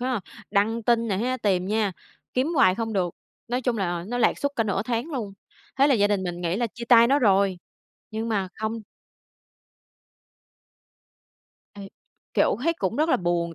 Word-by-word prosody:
ha, 250 -3 -1 0.3
đăng 220 +3 +1
tin 230 0 +2
nè 195 - 0
ha, 255 +5 -1
tìm 190 -6 0
nha, 210 -1 0 0.4
kiếm 255 +3 +2
hoài 185 -10 +5
không 225 +1 -3
được, 180 -4 -1 0.3
nói 245 +1 -1
chung 235 -3 0
là 175 -2 -2
nó 245 +1 -2
lạc - - +2
suốt 285 0 -1
cả 225 - +2
nửa 195 -1 -1
tháng 235 +6 -2
luôn. 220 -7 -4 0.5
Thế 275 - +6
là 275 - +4
gia 205 -2 +3
đình 205 -2 0
mình 175 -1 -4
nghĩ 175 +1 -1
là 240 +2 0
chia 235 +2 -8
tay 235 -1 +7
nó 275 +4 +3
rồi, 195 -6 +3 0.5
nhưng 220 +1 -3
mà 200 -4 -1
không. 220 +1 -4 2.9
Ê, 200 -1 -9 0.5
kiểu, - - +3
thấy 335 +3 +2
cũng 195 +4 -1
rất 310 +2 +2
là - - +4
buồn, 175 -1 -1
220 Hz, 185 wpm, -25 LUFS, 195-240 Hz, 2.9 s, tay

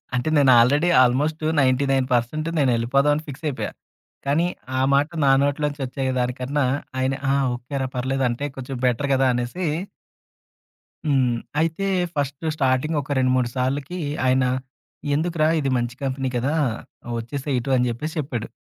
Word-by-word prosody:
అంటే 125 +5 0
నేను 135 -2 +6
already 145 +8 +4
almost 150 +5 +1
99% 135 +2 +1
నేనెళ్ళిపోదాం 135 +2 +2
అని 155 - -4
ఫిక్స్ 145 +2 -9
అయిపోయా. 140 - -3 0.5
కానీ, 145 +5 +2 0.3
ఆ - - +2
మాట 140 +1 +3 0.2
నా 135 - +6
నోట్లో 145 +1 +1
నుంచొచ్చేదాని 130 -3 -2
కన్నా 140 +2 0 0.3
ఆయన 130 +1 +1 0.2
ఆ! - - +3 0.2
ఓకే 125 +3 -6
రా! 130 - -1
పర్లేదు 130 +1 0
అంటే 120 +4 -3
కొంచెం 135 +1 -5
బెటర్ 125 +3 +1
కదా 135 0 +3
అనేసి 120 +5 -3 1.5
హ్మ్. 130 -6 +2 0.2
అయితే 165 +5 0 0.3
ఫస్ట్ 140 +2 -2
స్టార్టింగ్ 135 +3 +1
ఒక 145 +1 -9
రెండు, 130 0 +2
మూడు 125 -2 +1
సార్లకి 140 +7 -2 0.3
ఆయన 130 0 +3 0.7
"ఎందుకురా! 160 0 +1
ఇది 140 -2 0
మంచి 120 0 -2
కంపెనీ 135 0 -1
కదా! 135 +5 0 0.7
ఒచ్చేసేయి 135 +3 -3
ఇటు" 135 +2 -1
అని 125 0 +2
చెప్పేసి 150 +7 -4
చెప్పాడు. 125 -6 -3
135 Hz, 145 wpm, -23 LUFS, 125-145 Hz, 1.5 s, నేను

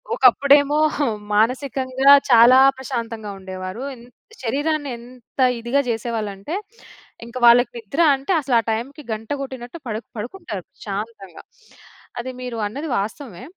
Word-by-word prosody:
ఒకప్పుడేమో 280 +3 +5 0.6
మానసికంగా 260 +4 +2 0.2
చాలా 240 +2 +7 0.2
ప్రశాంతంగా 230 -4 -5
ఉండేవారు. 185 +4 -7
ఎ - - -17 0.5
శరీరాన్ని 290 +4 -1
ఎంత 245 +2 -17 0.2
ఇదిగా 240 +4 0
చేసేవాళ్ళంటే, 225 - -3 0.7
ఇంక 235 +2 -13
వాళ్ళకి 240 +1 +6
నిద్ర 235 +9 -2
అంటే 270 +8 -5
అసలు 260 -3 0
ఆ - - +1
టైమ్‌కి 270 +7 -4
గంట 220 0 -8
గొట్టినట్టు 260 +1 -7
పడు 215 0 -3 0.2
పడుకుంటారు 210 - -6
ప్రశాంతంగా. 200 -3 -7 0.8
అది 255 +2 -4
మీరు 245 -2 -5
అన్నది 285 +9 -6
వాస్తవమే. 215 +1 -5
240 Hz, 115 wpm, -21 LUFS, 220-270 Hz, 0.8 s, చాలా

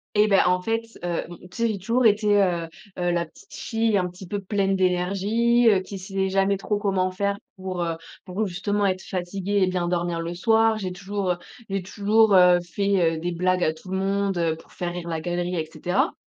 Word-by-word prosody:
Et 210 +1 +5
bah, 195 -3 +4
en 180 0 +2
fait, 225 +3 -1 0.2
heu, 175 -1 -1
m 175 - -10
tu - - -16
sais, 230 0 +2
j'ai 210 - -2
toujours 235 +6 +1
été, 210 -1 +4
heu 170 -3 -1 0.3
heu, 175 0 +1
la 170 0 0
petite - - -20
fille 225 -2 0
un 180 -1 +1
petit 180 +1 -11
peu 205 +1 -3
pleine 195 0 0
d'énergie, 200 +6 +2
heu, 195 -3 +4
qui 195 +1 -8
sait 190 0 -2
jamais 195 +1 +2
trop 205 +1 -1
comment 190 -3 0
faire 200 +2 -2 0.2
pour, 185 -2 -4
heu, 165 -1 -1 0.3
pour 195 +3 -2
justement 205 +2 -1
être 185 -1 0
fatiguée 195 +2 -2
et - - +3
bien 180 -2 -1
dormir 175 -1 -1
le 170 +1 -4
soir. 225 +3 +3
J'ai 185 -3 -4
toujours, 195 0 -2
heu, 175 - -1 0.3
j'ai 195 -1 -1
toujours, 205 +2 +3
heu, 180 -1 +7
fait, 180 -2 +1
heu, - - -5
des 175 +2 -2
blagues 180 +1 +1
à 155 - +2
tout 160 +4 -14
le 190 - 0
monde, 195 -1 0
heu, 165 -2 +1
pour - - -17
faire 175 -1 -3
rire 175 -1 -6
la 165 -1 -2
galerie 175 +1 -2
et 160 -1 -1
cetera. 185 - -1
190 Hz, 225 wpm, -24 LUFS, 175-205 Hz, 0.3 s, heu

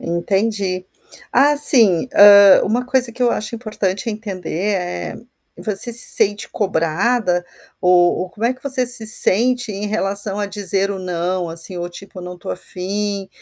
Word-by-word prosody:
Entendi. 190 +2 -3 0.5
Ah, 290 +3 +3
sim, 235 - +5
ah, 200 -1 +7
uma 235 +5 -2
coisa 255 -1 0
que 240 +2 -14
eu 240 - +2
acho 215 +2 -5
importante 215 -1 -4
entender 200 -2 -4
é, 180 -1 -6 0.4
você 215 +3 +2
se 235 - +3
sente 205 +1 0
cobrada 180 +1 -1 0.4
ou 180 -1 +3
ou 185 0 -5
como 220 +4 -3
é 250 - -1
que 255 - -22
você 260 -2 0
se 240 -2 +3
sente 245 +2 +1
em 200 +1 -5
relação 200 -1 0
a 205 - -2
dizer 200 -1 -2
o: 195 - -7
"Não.", 180 0 -3
assim? 165 +2 -1
Ou, 175 0 -5
tipo: 185 +2 -13
"Eu - - -11
não 180 0 -8
estou 180 +2 -9
afim.", 195 +2 -5
200 Hz, 165 wpm, -18 LUFS, 185-225 Hz, 0.5 s, ah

